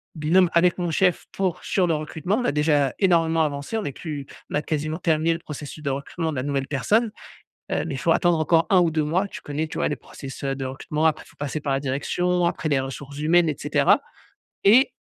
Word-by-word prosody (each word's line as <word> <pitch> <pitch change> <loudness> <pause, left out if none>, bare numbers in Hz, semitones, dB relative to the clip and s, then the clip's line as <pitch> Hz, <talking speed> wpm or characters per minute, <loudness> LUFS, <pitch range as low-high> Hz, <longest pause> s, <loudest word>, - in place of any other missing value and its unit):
binôme 165 +4 +3
avec 175 +1 +4
mon 175 -1 -1
chef 180 +2 +2
pour 190 -3 -2
sur 185 -3 +1
le 165 - +2
recrutement. 160 +6 -2
On 245 - -1
a - - +2
déjà 150 -3 +2
énormément 165 -4 +3
avancé, 145 +7 -3
on 220 - -3
est - - -2
plus 150 -3 -6 0.3
on - - -2
a 145 - +2
quasiment 155 +1 -2
terminé 165 -1 +2
le 165 - -5
processus 150 -1 -8
de 140 - -1
recrutement 160 +4 -3
de 145 - -5
la 130 - -1
nouvelle 140 -1 -1
personne. 210 - +1 0.6
Heu, - - 0
mais, - - -4
il - - -6
faut - - +2
attendre 175 -2 +3
encore 160 +1 +3
1 190 -2 +6
ou 170 -2 +3
2 155 -1 0
mois, 180 +7 0
tu - - -9
connais, 150 +2 -3
tu - - -8
vois? - - +1
Les 150 - -2
process, 135 +2 -10
heu, 135 0 0
de 135 - -4
recrutement, 150 +4 -3
après 155 -1 +1
il - - -18
faut - - -23
passer 145 +1 -3
par 145 -1 -1
la 135 - 0
direction, 175 +6 0
après 165 - -1
les 140 -2 +3
ressources 135 +1 -7
humaines 165 +2 +4
et 145 - -4
cetera. - - +3 0.6
Et 240 +7 +6
155 Hz, 245 wpm, -24 LUFS, 145-175 Hz, 0.6 s, 1